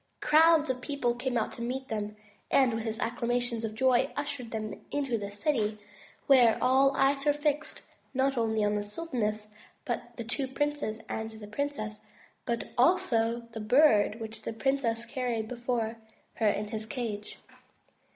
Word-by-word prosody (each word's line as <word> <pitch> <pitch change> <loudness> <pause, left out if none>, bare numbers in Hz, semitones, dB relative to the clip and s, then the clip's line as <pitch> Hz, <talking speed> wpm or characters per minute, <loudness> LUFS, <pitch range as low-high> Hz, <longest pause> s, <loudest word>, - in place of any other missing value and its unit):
Crowds 315 0 +5
of 255 -1 -5
people 255 -3 0
came 250 0 -2
out 220 - 0
to - - -8
meet 260 +3 -3
them, 210 -1 -3 0.3
and 260 -3 +4
with 225 0 -3
acclamations 240 0 -1
of 215 -1 -3
joy 260 +2 +3
ushered 285 -4 -3
them 215 -1 -5
into 275 -4 -1
the 205 -2 -3
city, 215 0 0 0.5
where 250 -5 +6
all 270 +2 +4
eyes 275 0 +3
were 295 0 +4
fixed, 295 +1 -2 0.3
not 270 +1 +1
only 220 -2 +1
on 205 - +1
the 210 - 0
sultaness, 215 -3 -3 0.3
the 240 0 -4
two 260 +4 -2
princes, 290 -5 -2
and 220 0 -3
the 220 -1 -9
princess, 215 -2 -3 0.5
but 235 0 -2
also 245 -7 +3
upon 235 -1 -12
the 225 - -6
Bird 220 -2 +4
which 220 0 -7
the - - -4
princess 235 -1 0
carried 235 -2 -2
before 235 -2 -2 0.4
her 220 -2 +2
in 210 0 -2
his 220 0 -5
cage. 220 -5 -4
240 Hz, 160 wpm, -29 LUFS, 220-270 Hz, 0.5 s, where